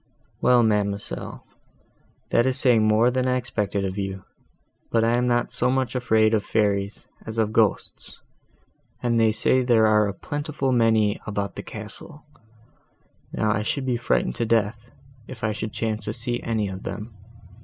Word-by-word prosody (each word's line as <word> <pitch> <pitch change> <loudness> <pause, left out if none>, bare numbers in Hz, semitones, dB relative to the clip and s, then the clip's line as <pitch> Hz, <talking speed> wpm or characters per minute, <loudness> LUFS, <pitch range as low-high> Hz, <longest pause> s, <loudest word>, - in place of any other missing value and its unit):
"Well, 125 -1 +5
ma'amselle, 100 - -1 0.9
that 120 +2 +3
is 130 0 +1
saying 115 -5 +4
more 110 +3 +4
than 130 0 0
I 125 0 +2
expected 105 -5 -2
of 95 +1 -3
you: 95 -1 -4 0.7
but 115 -1 +2
I 115 +1 +3
am 125 0 +1
not 120 0 +1
so 125 - 0
much 130 -2 0
afraid 110 -4 +2
of 105 -2 +2
fairies, 100 -2 -1 0.2
as 110 0 -5
of 110 -1 +1
ghosts, 110 -4 0 0.8
and 120 -1 +2
they 110 -1 +4
say 130 +4 +2
there 120 -3 +4
are 105 -1 +4
a 100 - -3
plentiful 145 +1 -3
many 110 -3 +3
of - - -25
them 110 - -5
about 100 -1 -3
the - - -5
castle: 110 +9 -10 1.1
now 110 - 0
I 105 - 0
should 130 +5 -2
be 125 -2 0
frightened 60 - 0
to 115 - 0
death, 115 +1 0 0.4
if 125 -4 -10
I 110 - +1
should 110 0 -4
chance 110 0 -3
to 105 - -3
see 120 +1 -3
any 110 -3 -1
of 95 0 -6
them. 110 +2 -6
110 Hz, 175 wpm, -24 LUFS, 105-120 Hz, 1.1 s, Well